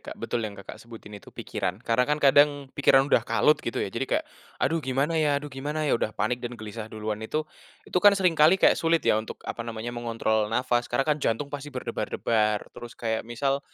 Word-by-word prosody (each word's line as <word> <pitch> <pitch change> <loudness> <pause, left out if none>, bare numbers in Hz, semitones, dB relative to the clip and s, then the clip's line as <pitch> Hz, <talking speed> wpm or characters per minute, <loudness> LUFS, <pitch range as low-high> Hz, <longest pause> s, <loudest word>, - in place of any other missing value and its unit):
Kak, - - -9
betul 120 - -3
yang, 100 - -12
Kakak, 100 - -10
sebutin 115 -2 -12
itu 105 - -11
pikiran. 90 +1 -4
Karena 125 +3 +1
kan 150 - +2
kadang 145 -1 +3
pikiran 135 -1 +4
udah 140 - +3
kalut - - +2
gitu - - -5
ya - - -2
jadi - - -3
kayak, - - 0 0.4
"Aduh 165 0 +1
gimana 135 +3 -1
ya 145 -2 +2
aduh 145 0 -6
gimana 150 +4 -3
ya?" 145 - +1
Udah 115 - +1
panik 120 +3 -1
dan 120 0 -6
gelisah 110 0 -7
duluan 110 -1 -4
itu 155 +8 -2 0.4
itu - - 0
kan 205 0 +6
sering 185 -3 +3
kali 160 +4 +5
kayak - - +5
sulit 165 0 +2
ya 110 - +3
untuk 110 - -8
apa - - -5
namanya, 115 0 -5
mengontrol 115 -2 -1
nafas 120 +1 0
karena 135 +3 0
kan 150 -1 0
jantung 140 +5 -1
pasti 145 0 -5
berdebar-debar. 110 -5 -1
Terus 120 0 -10
kayak 110 -1 -3
misal, 135 +3 -1
125 Hz, 215 wpm, -26 LUFS, 110-145 Hz, 0.4 s, kan